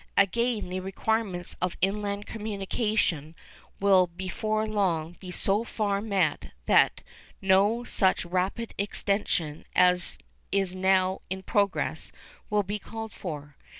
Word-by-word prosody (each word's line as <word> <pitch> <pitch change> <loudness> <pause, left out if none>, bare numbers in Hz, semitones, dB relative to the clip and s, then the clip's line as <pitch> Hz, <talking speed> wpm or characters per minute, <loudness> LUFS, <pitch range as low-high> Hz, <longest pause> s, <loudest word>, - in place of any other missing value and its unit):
Again, 215 +1 +2
the 185 +1 -2
requirements 195 -1 -2
of 180 -1 -1
inland 200 +1 0
communication 205 - -1 0.4
will 190 -2 +5
before 190 +5 -2
long 175 -6 0
be 185 - -9
so 195 +4 +1
far 205 -3 -1
met 200 -3 0 0.2
that - - +4 0.4
no 200 +4 +3
such 190 -6 +2
rapid 185 +6 -1
extension 200 -6 0
as 180 0 +3 0.3
is 195 -2 +1
now 185 0 +2
in 190 +1 -4
progress 200 0 0 0.4
will 210 -1 +2
be 205 +2 -3
called 225 +1 -7
for. 145 -5 -6
195 Hz, 115 wpm, -28 LUFS, 180-210 Hz, 0.4 s, will